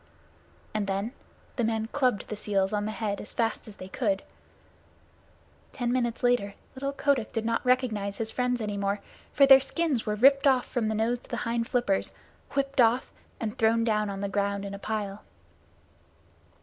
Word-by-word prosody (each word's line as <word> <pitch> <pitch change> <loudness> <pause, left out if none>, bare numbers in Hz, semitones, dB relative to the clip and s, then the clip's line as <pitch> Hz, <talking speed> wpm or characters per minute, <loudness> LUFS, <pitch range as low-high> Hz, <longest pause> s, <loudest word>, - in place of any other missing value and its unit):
and 210 -2 -1
then 200 +4 -1 0.5
the 240 - +1
men 220 -1 0
clubbed 255 -7 +1
the 215 - -4
seals 200 -1 0
on 205 0 0
the 215 - -2
head 215 -2 -3
as - - -8
fast 225 -1 -1
as 210 - -10
they 185 - -9
could. 195 -1 -1 1.5
Ten 245 -3 -1
minutes 240 -2 -1
later 245 -5 +2 0.2
little 275 +1 -3
Kotick 275 -4 0
did 225 -1 -2
not 230 0 0
recognize 230 -6 +1
his 220 -1 -2
friends 250 -1 0
any 210 -1 -2
more, 200 +1 0 0.3
for 280 - +6
their 270 -1 +9
skins 270 -2 -1
were 210 - +1
ripped 275 +5 +5
off 260 -2 +4
from 235 -4 -1
the 220 - 0
nose 230 +3 +1
to - - -21
the - - -3
hind 230 0 -1
flippers, 240 -6 +1 0.4
whipped 275 -1 +1
off 235 +2 +3 0.3
and 220 0 -3
thrown 230 0 +3
down 210 -2 +1
on 195 0 -5
the 200 - -1
ground 200 0 -1
in 200 - -5
a 200 - -6
pile. 210 -1 -3
225 Hz, 185 wpm, -28 LUFS, 205-250 Hz, 1.5 s, their